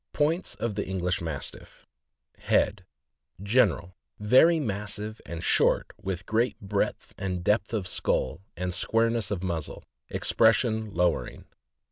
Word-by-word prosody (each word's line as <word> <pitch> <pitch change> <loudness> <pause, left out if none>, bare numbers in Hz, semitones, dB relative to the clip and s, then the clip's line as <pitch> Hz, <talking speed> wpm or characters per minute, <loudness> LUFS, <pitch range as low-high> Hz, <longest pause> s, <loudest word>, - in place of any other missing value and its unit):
POINTS 160 +5 0
OF 115 -2 -2
THE 100 - -3
ENGLISH 90 -2 -1
MASTIFF. 80 -5 -7 0.5
HEAD. - - +1 0.6
General. 100 -5 +2 0.2
— - - -45
Very 130 +11 +5
massive 105 -2 -4
and 85 0 -6
short, - - +3
with 95 -1 -4
great 115 +3 0
breadth 100 0 -2
and 90 -2 -3
depth 105 +3 +1
of 105 -5 -2
skull, 85 - -1 0.2
and 90 0 -2
squareness 115 +1 +1
of 95 -3 -3
muzzle. 85 -5 -4 0.3
Expression 110 -1 +2
lowering. 90 -2 0
100 Hz, 125 wpm, -27 LUFS, 90-115 Hz, 0.6 s, Very